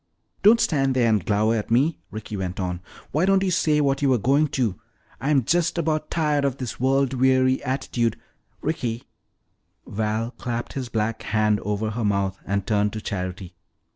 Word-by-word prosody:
"Don't 220 +3 +6
stand 135 - +1
there 120 -2 +3
and 110 -4 +2
glower 110 +3 +2
at 105 - -3
me," 140 +8 +2
Ricky 110 0 -7
went 95 -1 -4
on. 90 -1 -3 0.3
"Why 155 - +1
don't 195 0 +4
you 190 - +1
say 155 -3 +2
what 140 -1 +1
you 140 - +3
were 130 - +4
going 140 +7 +2
to? 110 -10 0 0.4
I'm 135 +1 +2
just 170 +7 +1
about 155 -2 -1
tired 150 -3 +1
of 140 -2 0
this 125 -3 -5
world 135 +1 +2
weary 130 0 +3
attitude 125 -4 -1 0.2
" - - -41
"Ricky!" 120 -7 -2 0.8
Val 110 +2 -2
clapped 120 -2 -5
his 130 -3 -4
black 110 0 -1
hand 105 -1 +1
over 105 +2 -2
her 115 +2 -3
mouth 100 -2 0
and 100 0 -1
turned 105 -1 +1
to 110 - -4
Charity. 90 -2 -5
120 Hz, 180 wpm, -24 LUFS, 105-140 Hz, 0.8 s, Don't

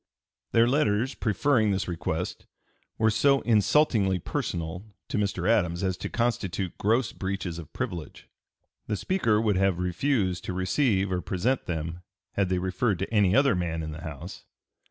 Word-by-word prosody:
Their 115 +1 +5
letters 125 -2 +1
preferring 110 +1 +2
this 95 -1 0
request 80 -2 -3 0.5
were 110 0 +3
"so 140 +5 +3
insulting 105 -3 +3
personally" 85 +2 -3 0.3
to - - -1
Mr. 100 -3 -1
Adams 90 -6 +2
as 95 -1 0
to - - -5
constitute 100 -7 -1
"gross 115 +4 +2
breaches 95 -3 -4
of 80 - -10
privilege." 90 - -5 0.6
"The 105 - -1
Speaker 115 - +1
would 105 -4 +1
have 95 -2 +2
refused 90 +1 0
to - - -3
receive 95 +1 +1
or 90 -1 0
present 115 +11 -1
them 85 0 -3 0.3
had 100 -2 0
they 90 - +1
referred 95 +3 0
to 95 +5 -4
any 100 -4 +4
other 140 -2 +5
man 85 -3 -2
in 80 - -5
the 80 +1 -8
House." 80 -4 -8
95 Hz, 155 wpm, -27 LUFS, 90-115 Hz, 0.6 s, Their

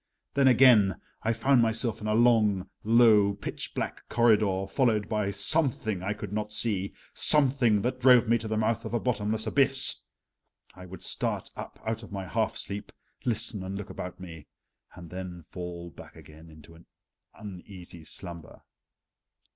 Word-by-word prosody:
Then 140 -1 +3
again, 120 -7 +5 0.2
I 115 - 0
found 120 +3 +2
myself 115 0 0
in 105 - -4
a 105 - +1
long, 110 -5 +3 0.2
low, 110 -3 +4
pitch 100 - -6
black - - -5
corridor, 105 -5 +2
followed 110 -1 +1
by 105 -2 -1
Something 115 - +1
I 100 +3 -2
could 105 -1 -8
not 105 0 -3
see 100 -3 0 0.2
Something 130 -8 +3
that 125 +1 -2
drove 125 -2 +5
me 115 +1 +2
to 110 - -6
the 110 0 -2
mouth 115 +1 0
of 115 0 -4
a - - +1
bottomless 110 -2 -2
abyss. 135 +3 +3 0.7
I 90 0 -12
would 90 -1 -10
start - - -2
up - - -9
out 110 0 -3
of 110 - -12
my 95 -2 -5
half 110 +3 -1
sleep, 100 +1 -6 0.3
listen 110 -3 -1
and 95 +1 -5
look 100 - -7
about 90 0 -7
me, 80 -5 -11 0.5
then 90 0 -8
fall 85 -1 -7
back - - -14
again 80 +2 -15
into 80 +1 -16
an 85 +1 -19 0.5
uneasy 90 -4 -11
slumber. 85 0 -9
105 Hz, 160 wpm, -27 LUFS, 95-115 Hz, 0.7 s, again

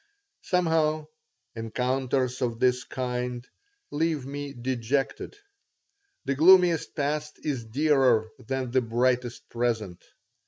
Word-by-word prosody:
Somehow, 160 -3 +1 0.5
encounters 125 +3 -1
of 115 -2 -1
this 125 0 +2
kind 125 -1 -4 0.4
leave 155 -2 0
me 145 +1 -5
dejected. 130 - -2 0.9
The 140 - 0
gloomiest 175 +2 +5
past 150 +1 -2
is 135 -7 -2
dearer 130 -3 +3
than 130 0 -3
the 130 +1 +3
brightest 120 +1 0
present. 115 -6 -2
130 Hz, 95 wpm, -27 LUFS, 120-150 Hz, 0.9 s, gloomiest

